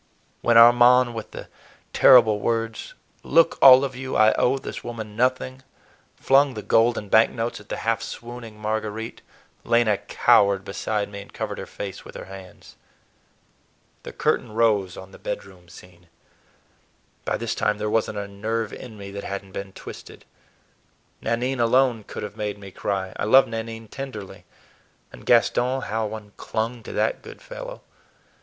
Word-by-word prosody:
When 120 Hz, -1 st, +4 dB
Armand, 120 Hz, +1 st, +6 dB
with 110 Hz, -2 st, -7 dB
the -, -, -9 dB, 0.5 s
terrible 115 Hz, -5 st, +6 dB
words, 115 Hz, +1 st, -3 dB, 0.3 s
"Look, 165 Hz, +2 st, +3 dB
all 130 Hz, 0 st, +9 dB
of 135 Hz, -2 st, -3 dB
you, 130 Hz, +1 st, -5 dB
I 110 Hz, 0 st, +5 dB
owe 130 Hz, +2 st, +2 dB
this -, -, -7 dB
woman 110 Hz, -3 st, -7 dB
nothing!" 130 Hz, +2 st, 0 dB, 0.5 s
flung 135 Hz, -1 st, +3 dB
the 105 Hz, -, -6 dB
gold 115 Hz, +1 st, +3 dB
and 105 Hz, -, -5 dB
bank 110 Hz, +1 st, +6 dB
notes 115 Hz, 0 st, -4 dB
at 105 Hz, -, -17 dB
the -, -, -3 dB
half 115 Hz, 0 st, +1 dB
swooning 120 Hz, -2 st, -8 dB
Marguerite, 110 Hz, +1 st, -4 dB, 0.4 s
Lena 115 Hz, -3 st, +2 dB
cowered 100 Hz, -1 st, +3 dB
beside 105 Hz, +1 st, -2 dB
me 100 Hz, 0 st, -8 dB
and 100 Hz, -, -14 dB
covered -, -, -5 dB
her -, -, -7 dB
face 100 Hz, -2 st, -7 dB
with -, -, -13 dB
her -, -, -8 dB
hands. 95 Hz, -1 st, -13 dB, 1.2 s
The -, -, -9 dB
curtain -, -, -1 dB
rose 105 Hz, -5 st, +1 dB
on 95 Hz, 0 st, -11 dB
the -, -, -14 dB
bedroom 90 Hz, -2 st, -7 dB
scene. 90 Hz, -1 st, -16 dB, 1.2 s
By -, -, -1 dB
this 115 Hz, -1 st, -3 dB
time 105 Hz, -1 st, 0 dB
there 105 Hz, 0 st, -3 dB
was 110 Hz, +1 st, +1 dB
n't 105 Hz, -, -6 dB
a 100 Hz, 0 st, -4 dB
nerve 110 Hz, +3 st, -3 dB
in 115 Hz, -4 st, -10 dB
me 100 Hz, -1 st, -9 dB
that 100 Hz, 0 st, -7 dB
had 100 Hz, 0 st, -5 dB
n't 95 Hz, -, -18 dB
been 100 Hz, 0 st, -6 dB
twisted. -, -, -11 dB, 1.0 s
Nanine 125 Hz, +3 st, -1 dB
alone 120 Hz, -2 st, +2 dB
could -, -, -7 dB
have 105 Hz, -, -7 dB
made 105 Hz, -1 st, -4 dB
me 100 Hz, -1 st, -11 dB
cry. 95 Hz, -1 st, -3 dB
I -, -, -2 dB
loved 130 Hz, +5 st, +6 dB
Nanine 115 Hz, 0 st, -6 dB
tenderly; 120 Hz, -5 st, -8 dB, 0.7 s
and -, -, -14 dB
Gaston, 125 Hz, +2 st, +3 dB
how 110 Hz, +1 st, -2 dB
one 105 Hz, -1 st, -9 dB
clung 115 Hz, +2 st, -3 dB
to -, -, -9 dB
that -, -, 0 dB
good -, -, -12 dB
fellow! -, -, -9 dB
110 Hz, 165 wpm, -23 LUFS, 105-120 Hz, 1.2 s, all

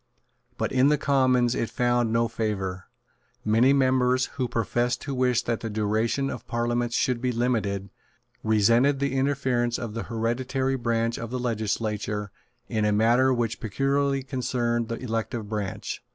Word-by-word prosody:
But -, -, -1 dB
in 130 Hz, +1 st, +4 dB
the 150 Hz, -, +3 dB
Commons 130 Hz, -4 st, +2 dB
it 115 Hz, -, -1 dB
found 120 Hz, -1 st, +1 dB
no 115 Hz, +1 st, +2 dB
favour. 100 Hz, -5 st, -3 dB, 0.6 s
Many 115 Hz, +5 st, +4 dB
members, 130 Hz, -1 st, +3 dB
who 130 Hz, -3 st, -1 dB
professed 120 Hz, +1 st, 0 dB
to 140 Hz, -, -4 dB
wish 125 Hz, -2 st, +2 dB
that 115 Hz, -1 st, -1 dB
the 115 Hz, -, -4 dB
duration 110 Hz, +6 st, 0 dB
of 125 Hz, -, -8 dB
parliaments 120 Hz, 0 st, -1 dB
should 125 Hz, -2 st, +1 dB
be 125 Hz, -1 st, 0 dB
limited, 105 Hz, -5 st, -1 dB, 0.5 s
resented 115 Hz, +6 st, +3 dB
the 140 Hz, -1 st, -1 dB
interference 130 Hz, -3 st, +1 dB
of 115 Hz, -4 st, -5 dB
the 115 Hz, -, -4 dB
hereditary 130 Hz, +4 st, -1 dB
branch 115 Hz, -1 st, -1 dB
of 115 Hz, -, -5 dB
the 125 Hz, -, -3 dB
legislature 105 Hz, -3 st, -2 dB, 0.4 s
in 110 Hz, -1 st, -1 dB
a 105 Hz, -, +2 dB
matter 120 Hz, +5 st, +4 dB
which 120 Hz, -2 st, -1 dB
peculiarly 135 Hz, +4 st, 0 dB
concerned 120 Hz, -3 st, -1 dB
the 115 Hz, -, -3 dB
elective 115 Hz, -2 st, -3 dB
branch. 105 Hz, -3 st, -4 dB
120 Hz, 150 wpm, -26 LUFS, 110-130 Hz, 0.6 s, in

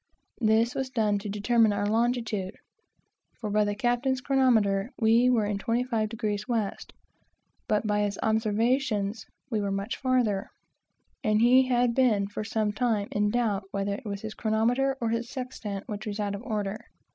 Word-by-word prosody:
This 225 Hz, +1 st, +3 dB
was 265 Hz, -1 st, -3 dB
done 215 Hz, -5 st, +1 dB
to 205 Hz, +1 st, -6 dB
determine 220 Hz, +2 st, +3 dB
our 205 Hz, 0 st, -1 dB
longitude; 225 Hz, -3 st, 0 dB, 0.8 s
for 210 Hz, -3 st, -4 dB
by 210 Hz, +1 st, +3 dB
the 205 Hz, 0 st, -1 dB
captain's 245 Hz, +3 st, 0 dB
chronometer 235 Hz, -7 st, +2 dB
we 230 Hz, +2 st, +4 dB
were 230 Hz, -4 st, +3 dB
in 205 Hz, -1 st, -2 dB
25º 230 Hz, 0 st, 0 dB
W., 215 Hz, -1 st, -2 dB, 0.8 s
but 210 Hz, +1 st, +1 dB
by 210 Hz, 0 st, +1 dB
his 205 Hz, -1 st, -1 dB
observations 220 Hz, -1 st, 0 dB, 0.2 s
we 215 Hz, -2 st, 0 dB
were 200 Hz, -, -1 dB
much 195 Hz, +3 st, -3 dB
farther, 245 Hz, -7 st, 0 dB, 0.7 s
and 215 Hz, 0 st, +2 dB
he 255 Hz, +3 st, +5 dB
had 245 Hz, -1 st, +2 dB
been 230 Hz, -6 st, +3 dB
for 205 Hz, +1 st, -5 dB
some 215 Hz, -1 st, -1 dB
time 210 Hz, -2 st, 0 dB
in 205 Hz, 0 st, +1 dB
doubt 210 Hz, -4 st, 0 dB
whether 200 Hz, 0 st, -2 dB
it 245 Hz, -, -6 dB
was 200 Hz, -1 st, -4 dB
his 220 Hz, -1 st, -6 dB
chronometer 240 Hz, +5 st, +1 dB
or 230 Hz, -, -1 dB
his 230 Hz, +1 st, -2 dB
sextant 230 Hz, -7 st, -6 dB
which 210 Hz, 0 st, -6 dB
was 210 Hz, 0 st, -4 dB
out 205 Hz, -1 st, -1 dB
of 200 Hz, -, -5 dB
order. 215 Hz, -4 st, -3 dB
220 Hz, 165 wpm, -27 LUFS, 205-240 Hz, 0.8 s, he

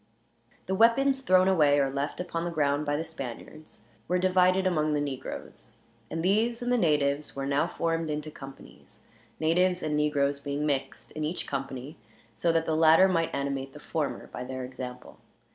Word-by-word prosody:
The 190 Hz, -, -2 dB
weapons 265 Hz, +6 st, +4 dB
thrown 185 Hz, -6 st, +4 dB
away 150 Hz, -6 st, +4 dB
or 135 Hz, -1 st, +1 dB
left 140 Hz, +2 st, -3 dB
upon 170 Hz, -2 st, -3 dB
the 175 Hz, -, -2 dB
ground, 150 Hz, -2 st, 0 dB
by 145 Hz, -, +1 dB
the 160 Hz, -, -2 dB
Spaniards, 155 Hz, -3 st, -9 dB, 0.2 s
were 180 Hz, -, +1 dB
divided 185 Hz, +1 st, +3 dB
among 155 Hz, -4 st, +1 dB
the -, -, +1 dB
negroes; 140 Hz, -3 st, -6 dB, 0.4 s
and 160 Hz, +1 st, -3 dB
these 230 Hz, +5 st, +1 dB
and 245 Hz, -, -1 dB
the 245 Hz, -, +3 dB
natives 150 Hz, -4 st, +1 dB
were 135 Hz, 0 st, -3 dB
now 140 Hz, +4 st, +1 dB
formed 165 Hz, -1 st, -2 dB
into 150 Hz, 0 st, -4 dB
companies, 135 Hz, -2 st, -13 dB, 0.4 s
natives 180 Hz, +3 st, +2 dB
and 150 Hz, -1 st, -1 dB
negroes 145 Hz, -2 st, +1 dB
being 145 Hz, +1 st, -3 dB
mixed 140 Hz, -3 st, -2 dB
in 155 Hz, -, -5 dB
each 160 Hz, +4 st, -2 dB
company, 135 Hz, +1 st, -5 dB, 0.4 s
so 165 Hz, +11 st, +1 dB
that 165 Hz, 0 st, +1 dB
the 160 Hz, -, 0 dB
latter 160 Hz, +3 st, +6 dB
might 165 Hz, -3 st, +1 dB
animate 140 Hz, -1 st, -3 dB
the 150 Hz, -, -11 dB
former 150 Hz, -1 st, -3 dB
by 125 Hz, -, -7 dB
their 130 Hz, 0 st, -5 dB
example. 125 Hz, 0 st, -8 dB
155 Hz, 180 wpm, -28 LUFS, 140-180 Hz, 0.4 s, latter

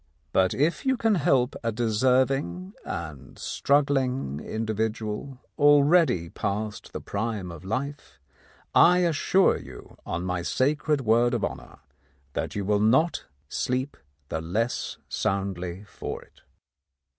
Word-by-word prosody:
But 95 Hz, -1 st, +3 dB
if 155 Hz, +5 st, +1 dB
you 265 Hz, -1 st, +2 dB
can 225 Hz, -2 st, +2 dB
help 135 Hz, -7 st, +2 dB
a 115 Hz, -, 0 dB
deserving 115 Hz, -4 st, +1 dB
and 75 Hz, -5 st, -7 dB
struggling 135 Hz, -, +1 dB
in 110 Hz, +7 st, -4 dB
dividual 110 Hz, +4 st, -3 dB, 0.2 s
already 145 Hz, -, +5 dB
past 105 Hz, +3 st, -4 dB
the -, -, -5 dB
prime 100 Hz, -3 st, -3 dB
of 85 Hz, +1 st, -10 dB
life, 140 Hz, -, -4 dB, 0.5 s
I 180 Hz, +1 st, +6 dB
assure 175 Hz, +3 st, +3 dB
you, -, -, -12 dB
on 85 Hz, +2 st, -3 dB
my 90 Hz, -1 st, -1 dB
sacred 145 Hz, -, +1 dB
word 120 Hz, +1 st, +3 dB
of 110 Hz, -, 0 dB
honour, -, -, -7 dB, 0.6 s
that -, -, -3 dB
you 100 Hz, -2 st, -2 dB
will 105 Hz, +1 st, +2 dB
not 130 Hz, +11 st, +3 dB, 0.2 s
sleep 130 Hz, -, -2 dB, 0.3 s
the 80 Hz, -, -2 dB
less 110 Hz, +9 st, -2 dB
soundly 95 Hz, -1 st, -2 dB
for 105 Hz, -, -7 dB
it. -, -, -25 dB
115 Hz, 125 wpm, -26 LUFS, 95-140 Hz, 0.6 s, I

